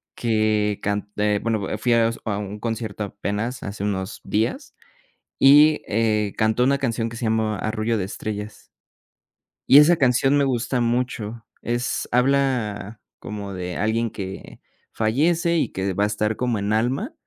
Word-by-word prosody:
que 110 -3 +1
can 105 0 -2
eh, 105 0 +1
bueno, 110 -4 -2
fui 120 - +1
a 115 -1 +4
s 115 - -6
a 105 -3 -1
un 105 0 -6
concierto, 110 -2 -3
apenas, 105 +5 -4
hace 100 0 -5
unos 95 -2 -3
días 110 +2 -2 0.6
y, 150 +3 +6
eh, 105 -1 0
cantó 110 +3 +2
una 140 +1 +3
canción 115 -4 -1
que 115 - -8
se 115 - -6
llama 110 -1 0
"Arrullo 110 +3 -1
de 100 - -1
estrellas". 105 +2 -6 1.0
Y 140 - +9
esa 160 +4 +6
canción 135 -1 +3
me 140 - +3
gusta 125 -1 -1
mucho. 120 -2 -2 0.2
Es 120 +1 -2
habla 125 -5 0 0.2
como 100 -1 -6
de 90 -1 -5
alguien 115 +2 0
que 95 -1 -8 0.3
fallece 165 +10 +1
y 160 - 0
que 95 0 -2
va 100 +3 +1
a - - +3
estar 105 +1 -1
como 120 -4 -1
en 100 +1 -1
alma, 130 - 0
110 Hz, 160 wpm, -23 LUFS, 105-125 Hz, 1.0 s, Y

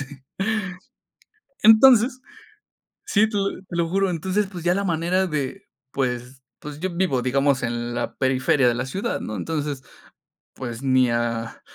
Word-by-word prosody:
así. 145 - -3 1.6
Entonces 240 +3 +6 0.8
Sí, 215 +1 +3
te 210 - -4
lo 195 0 +1
te 180 - -8
lo 170 -1 +1
juro. 195 +2 +1
Entonces, 190 +5 -1
pues, 175 -4 -8
ya 175 +1 +3
la 200 - 0
manera 175 +2 +1
de 145 -6 -3 0.3
pues 125 0 -3 0.2
pues, 150 0 -8
yo 185 0 -2
vivo, 160 -9 0
digamos, 135 +1 +1
en 120 0 -3
la - - -3
periferia 130 0 +2
de 120 - +2
la 125 +2 -3
ciudad, 195 - -3
¿no? 110 - -5
Entonces, 150 -4 -3 0.7
pues 120 -1 -6
ni 130 -2 +3
a 115 -1 -2
145 Hz, 155 wpm, -23 LUFS, 130-190 Hz, 1.6 s, Entonces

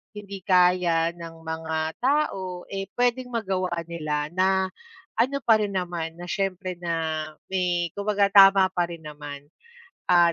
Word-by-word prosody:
hindi 200 -1 -7
kaya 180 -3 +4
ng 165 -1 -10
mga 160 0 -4 0.2
tao, 195 -10 0
eh, 195 0 -3
pwedeng 245 0 0
magawa 190 -5 -1
nila 155 -3 -3
na 190 +1 +2 0.5
ano 265 +4 +2
pa 225 -1 +6
rin 205 -1 -1
naman, 175 -3 -3
na 175 - -10
syempre 185 -2 -2
na 160 -2 -2 0.2
may 175 -2 0
kumbaga 200 0 +2
tama 195 -1 +7
parin 170 -2 -2
naman. 145 -2 -8 0.7
At 175 -1 +6
180 Hz, 135 wpm, -25 LUFS, 165-195 Hz, 0.7 s, tama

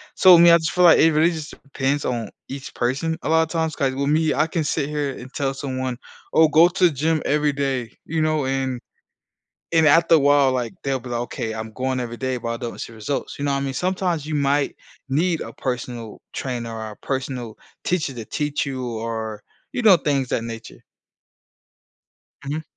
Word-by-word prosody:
So, 185 -2 +8
I - - +6
mean, 170 0 +8
I - - +8
just 160 -1 -2
feel 180 - +2
like 165 - +7
it 160 +1 +6
really 160 +3 +4
just 160 -3 -6
depends 140 +1 -1
on 115 -4 -2 0.2
each 135 0 -7
person 135 +7 -1
a - - -2
lotta 160 0 +3
times 160 -2 -1
'cause 135 -4 0
with 140 +1 -1
me, 155 0 +2
I 155 - +3
can 165 0 -1
sit 145 -1 -1
here 145 -2 -1
and 130 +2 -11
tell 135 -2 -1
someone, 130 -2 -3 0.4
"Oh, 160 0 +6
go 160 +3 +6
to 180 0 +2
the 170 - +5
gym 155 +3 0
every 150 0 +2
day" 135 -4 -2
you 160 0 -1
know, 155 -3 +1
and 130 -1 -1 0.9
and 160 -1 +5
after 165 +3 +6
a - - +5
while, 140 -2 +4
like, 120 -5 -2
they'll 135 -1 0
be 125 - -9
like, 120 - -2
"Okay, 110 -2 -4
I'm 110 0 -6
going 130 0 -1
every 120 -1 -4
day, 130 0 -2
but 115 0 -5
I - - -4
don't 120 -1 -6
see - - -7
results." 110 +5 -4
You 140 - -5
know 140 - +1
what 140 - +1
I - - -1
mean? 135 -1 -2
Sometimes 180 -1 -1
you 155 - -4
might 140 0 +1 0.3
need 165 +5 +1
a - - -6
personal 120 -3 -5
trainer 120 -3 -4
or 110 -1 -6
a 105 - -11
personal 130 -4 -4 0.3
teacher 165 -6 -1
to 115 -3 -6
teach 150 +4 -2
you 130 -2 -4 0.2
or, 110 -2 -4 0.3
you 245 - -1
know, 205 -6 +7
things 140 -3 0
that 115 - -1
nature. 115 -1 -9 1.6
Mhm. 150 +3 -3
140 Hz, 215 wpm, -22 LUFS, 125-155 Hz, 1.6 s, So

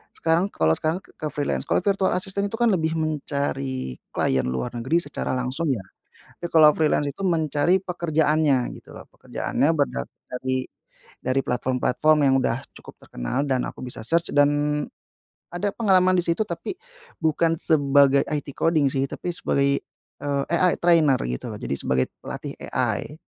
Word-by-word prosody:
sekarang 165 +3 +1
kalau 80 - +2
sekarang 160 +2 -1
ke 155 - -7
freelance 145 - -2
kalau - - +3
virtual 195 -1 +2
assistant 200 +2 -2
itu 225 - -5
kan 240 -1 +4
lebih 160 -3 0
mencari 140 - -2 0.2
klien 65 -1 +1
luar 65 - -3
negeri 130 +8 +1
secara 145 - -4
langsung 130 +6 -2
ya, 125 -7 0 0.6
tapi - - -4
kalau 155 -2 +8
freelance 150 -2 +2
itu 195 - -9
mencari 160 +1 +2
pekerjaannya, 155 -6 +1
gitu - - -15
loh, - - -11
pekerjaannya 150 - -1
berdatangan 65 - -3
dari 130 +1 -2 0.6
dari 130 +1 0
platform-platform 130 +5 +1
yang 135 - +4
udah 120 0 0 0.2
cukup - - -12
terkenal, 60 - -3
dan 130 -3 0
aku - - -9
bisa 125 - -8
search 170 +5 +1
dan 145 0 +5 1.0
ada 175 +4 -1
pengalaman 185 -4 +3
disitu, 170 +2 +1
tapi 175 - -4 0.5
bukan 160 +1 +2
sebagai 140 -2 +4
IT 145 -1 -3
coding 160 -3 +2
sih, 135 0 0
tapi 180 - -4
sebagai, 140 -4 +1 0.4
eee, 140 -1 -1
AI 175 +1 +3
trainer, 160 -6 +4
gitu 60 0 -4
loh, - - -7
jadi - - -2
sebagai 65 0 +1 0.2
pelatih - - -6 0.2
AI. - - -1
150 Hz, 155 wpm, -24 LUFS, 135-170 Hz, 1.0 s, kalau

